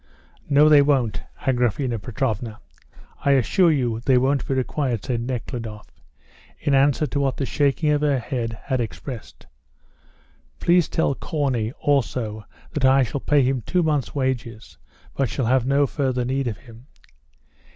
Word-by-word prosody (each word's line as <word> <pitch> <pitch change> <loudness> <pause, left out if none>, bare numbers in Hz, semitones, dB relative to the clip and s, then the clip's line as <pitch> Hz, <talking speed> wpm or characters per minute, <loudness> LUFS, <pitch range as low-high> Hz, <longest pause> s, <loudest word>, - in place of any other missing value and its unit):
"No, 145 +1 +6
they 150 -2 +7
won't, 135 -7 +1 0.2
Agraphena 125 -1 0
Petrovna; 110 -2 -3 0.6
I 140 - +4
assure 165 - +3
you 120 -6 0
they 125 +2 +3
won't 135 +2 +1
be 135 - 0
required," 130 -3 -1
said 120 -2 -1
Nekhludoff, 115 -3 -5 0.7
in 145 - 0
answer 140 +2 +3
to 145 - -2
what 135 -2 0
the 135 - -1
shaking 145 +3 +1
of 150 0 +1
her 145 -2 +2
head 115 -2 -3
had 130 -3 -1
expressed. 120 +1 -7 1.1
"Please 175 -2 +3
tell 160 -4 +1
Corney 130 -7 -2
also 120 -7 -1 0.3
that 145 - -2
I 135 +1 +5
shall 130 +3 -4
pay 145 -2 +3
him 130 0 0
two 180 - 0
months' 150 -5 -1
wages, 120 -5 -3 0.4
but 135 -3 0
shall 130 - -2
have 125 +1 +2
no 140 +1 +3
further 130 -1 -1
need 135 +1 -1
of 110 -4 -3
him." 115 +2 -16
130 Hz, 150 wpm, -23 LUFS, 120-140 Hz, 1.1 s, they